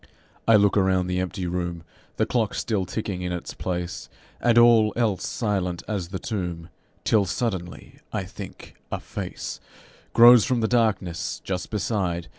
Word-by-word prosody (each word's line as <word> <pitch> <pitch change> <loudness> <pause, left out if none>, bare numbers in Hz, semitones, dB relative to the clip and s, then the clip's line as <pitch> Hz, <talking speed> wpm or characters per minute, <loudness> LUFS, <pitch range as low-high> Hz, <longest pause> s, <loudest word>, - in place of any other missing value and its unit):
I 115 - +7
look 100 -1 +4
around 95 -2 +3
the 90 0 -1
empty 90 0 -3
room, 85 -1 -3 0.3
The - - +2
clock 115 -4 0
still 100 -5 -1
ticking 100 -3 -3
in 90 0 -3
its 90 -1 -5
place, 90 -1 -4 0.3
And 120 -1 +3
all 115 -2 +6
else 110 -5 0
silent 95 -6 -2
as 100 -5 -2
the 95 +2 -5
tomb, 90 -5 -4 0.3
Till 105 -3 +3
suddenly, 95 -4 -4
I - - -2
think, - - -10 0.2
a - - -2
face - - -6 0.5
Grows 120 -1 +9
from 120 +3 0
the 110 - +2
darkness 110 -8 0
just 90 -2 -3
beside. 95 -5 -2
95 Hz, 155 wpm, -25 LUFS, 90-110 Hz, 0.5 s, Grows